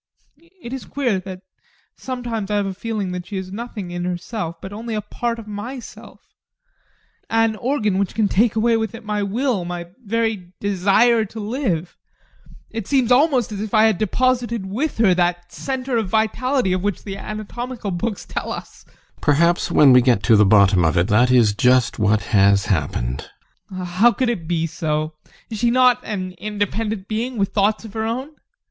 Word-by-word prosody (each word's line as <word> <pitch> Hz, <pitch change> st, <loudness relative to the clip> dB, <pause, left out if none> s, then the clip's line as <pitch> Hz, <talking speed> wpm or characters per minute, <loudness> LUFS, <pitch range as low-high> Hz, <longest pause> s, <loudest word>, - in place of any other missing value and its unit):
It 235 Hz, -, -6 dB
is 265 Hz, -, -6 dB
queer 245 Hz, -9 st, -1 dB
that 185 Hz, 0 st, -8 dB, 0.5 s
sometimes 240 Hz, -5 st, -4 dB
I 210 Hz, -, 0 dB
have 205 Hz, -1 st, +1 dB
a 195 Hz, -, -3 dB
feeling 205 Hz, -1 st, -3 dB
that 180 Hz, 0 st, -5 dB
she 205 Hz, -, -5 dB
is 190 Hz, 0 st, -6 dB
nothing 210 Hz, -4 st, -6 dB
in 175 Hz, 0 st, -4 dB
herself, 175 Hz, -1 st, -4 dB
but 190 Hz, +3 st, -8 dB
only 225 Hz, +1 st, -5 dB
a 210 Hz, -, -1 dB
part 235 Hz, +3 st, -3 dB
of 230 Hz, -, -9 dB
myself 235 Hz, +5 st, -8 dB, 1.1 s
an 225 Hz, -1 st, +2 dB
organ 215 Hz, -7 st, 0 dB
that 200 Hz, -2 st, -1 dB
can 220 Hz, -2 st, +2 dB
take 220 Hz, +3 st, +2 dB
away 230 Hz, +1 st, +3 dB
with 225 Hz, +1 st, -3 dB
it 230 Hz, -1 st, -11 dB
my 210 Hz, -1 st, -1 dB
will, 220 Hz, 0 st, 0 dB
my 175 Hz, -1 st, -6 dB
very 220 Hz, -4 st, -2 dB
desire 205 Hz, +4 st, +3 dB
to 220 Hz, +2 st, -9 dB
live. 205 Hz, -, -2 dB, 0.8 s
It 225 Hz, -3 st, -5 dB
seems 260 Hz, -4 st, +2 dB
almost 255 Hz, -3 st, +3 dB
as 205 Hz, -1 st, -4 dB
if 215 Hz, 0 st, -3 dB
I 215 Hz, -, +6 dB
had 220 Hz, -5 st, +3 dB
deposited 235 Hz, 0 st, 0 dB
with 240 Hz, +11 st, -2 dB
her 215 Hz, -5 st, +4 dB
that 175 Hz, 0 st, 0 dB
centre 260 Hz, -2 st, -3 dB
of 220 Hz, -4 st, -1 dB
vitality 225 Hz, +1 st, +1 dB
of 185 Hz, -, -1 dB
which 205 Hz, -2 st, -2 dB
the 195 Hz, -1 st, -6 dB
anatomical 215 Hz, +2 st, -5 dB
books 195 Hz, +4 st, -3 dB
tell -, -, -4 dB
us. -, -, -8 dB
GUSTAV. -, -, -31 dB
Perhaps, 170 Hz, +4 st, +2 dB
when 140 Hz, -3 st, +7 dB
we 125 Hz, -, +7 dB
get 120 Hz, -5 st, +2 dB
to 110 Hz, +4 st, +5 dB
the 105 Hz, -, +6 dB
bottom 100 Hz, -3 st, +5 dB
of 80 Hz, -1 st, +2 dB
it, 85 Hz, +5 st, +2 dB
that 120 Hz, +4 st, +4 dB
is 120 Hz, -5 st, +4 dB
just 125 Hz, +3 st, +2 dB
what 105 Hz, 0 st, +2 dB
has 100 Hz, -1 st, +3 dB
happened. 65 Hz, -, -2 dB, 0.4 s
ADOLPH. 185 Hz, -1 st, -5 dB
How 200 Hz, +7 st, +4 dB
could 255 Hz, -2 st, 0 dB
it 170 Hz, -9 st, -5 dB
be 165 Hz, -1 st, 0 dB
so? 155 Hz, -1 st, -2 dB, 0.4 s
Is 220 Hz, -, -4 dB
she 240 Hz, -, +3 dB
not 250 Hz, 0 st, +4 dB
an 185 Hz, -3 st, -4 dB
independent 210 Hz, 0 st, -3 dB
being, 235 Hz, +3 st, -3 dB
with 195 Hz, -1 st, +1 dB
thoughts 210 Hz, +2 st, +1 dB
of 210 Hz, -, -10 dB
her 220 Hz, -, -2 dB
own? 250 Hz, +6 st, -3 dB
205 Hz, 190 wpm, -21 LUFS, 175-230 Hz, 1.1 s, when